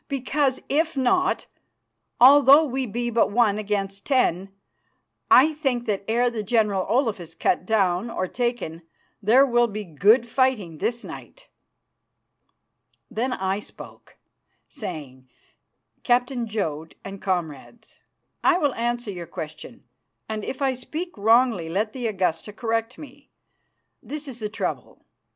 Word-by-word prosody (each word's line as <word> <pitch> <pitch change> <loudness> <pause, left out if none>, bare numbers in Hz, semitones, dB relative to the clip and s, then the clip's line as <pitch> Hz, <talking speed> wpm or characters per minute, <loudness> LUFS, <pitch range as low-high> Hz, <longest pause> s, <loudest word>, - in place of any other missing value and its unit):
"Because, 275 -1 0
if 315 +1 0
not, 360 +9 +1 0.7
although 280 +3 +8
we 265 -3 -2
be 240 +3 -3
but 230 -1 +2
one 210 -1 +2
against 200 -1 -3
ten, 195 - +1 0.8
I 310 +5 +6
think 265 -6 -1
that 205 -4 -2
ere 240 +2 +2
the 225 -2 -3
General 210 -3 +1
Olaf 235 -4 +1
is 165 -1 -10
cut 180 - 0
down 195 -1 +1
or 185 -5 -2
taken 240 -9 -3 0.4
there 240 +7 +5
will 240 -2 +3
be 215 -1 -5
good 205 - +3
fighting 230 - 0
this 235 +3 -2
night." - - -11 1.6
Then 245 +4 -1
I 190 -3 -1
spoke, - - -13 0.5
saying, 130 -6 -8 0.7
"Captain 245 -1 +1
Jodd, 160 -8 -4
and 195 0 -8
comrades, 180 - -5 0.4
I 355 0 +4
will 290 -6 +1
answer 240 -1 -2
your 175 -3 -7
question, 155 -3 -9 0.4
and 215 -1 -4
if 270 +5 -4
I 265 -1 +2
speak 315 +8 -6
wrongly 225 -4 +3
let 210 +5 -1
the 245 -3 -3
Augusta 185 -2 -1
correct 225 +2 -2
me. 285 -1 -13 0.7
This 300 0 -6
is 250 -3 -7
the 210 -2 -3
trouble. 210 - -5
230 Hz, 135 wpm, -24 LUFS, 195-255 Hz, 1.6 s, although